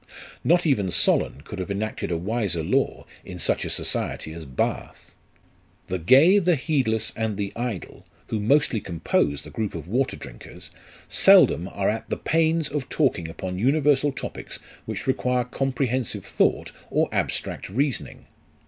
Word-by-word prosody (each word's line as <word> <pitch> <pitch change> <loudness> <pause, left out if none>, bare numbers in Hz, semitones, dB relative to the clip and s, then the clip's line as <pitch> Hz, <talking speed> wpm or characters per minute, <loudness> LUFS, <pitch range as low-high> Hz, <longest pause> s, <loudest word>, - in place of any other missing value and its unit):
Not 175 +2 +3
even 105 - +2
Solon 75 -4 +2
could 95 +5 -8
have 90 - -4
enacted 110 +2 -3
a 85 - 0
wiser 95 -3 -1
law - - 0 0.2
in - - -8
such - - 0
a - - -3
society 80 - -3
as 80 -1 -8
Bath. 65 -2 -3 0.8
The 90 0 -1
gay, 140 - +6
the 180 -2 +3
heedless, 130 -7 0
and 110 -3 -2
the 100 -1 -3
idle, 120 -6 -5 0.2
who 110 - -3
mostly 120 0 +2
compose 80 -4 0
the - - -10
group 110 -5 -3
of 80 -1 -7
water 125 +7 0
drinkers, - - -10 0.4
seldom 85 +4 +6
are 100 0 -2
at 110 +1 -2
the - - -1
pains 165 -1 +1
of 145 -3 -4
talking 125 - +1
upon 90 +2 -5
universal 145 +3 +3
topics 135 - -6 0.3
which - - -4
require 125 -1 +1
comprehensive 130 -1 -2
thought - - +1 0.2
or - - +2
abstract - - -2
reasoning. 130 +2 -2
115 Hz, 150 wpm, -24 LUFS, 95-140 Hz, 0.8 s, gay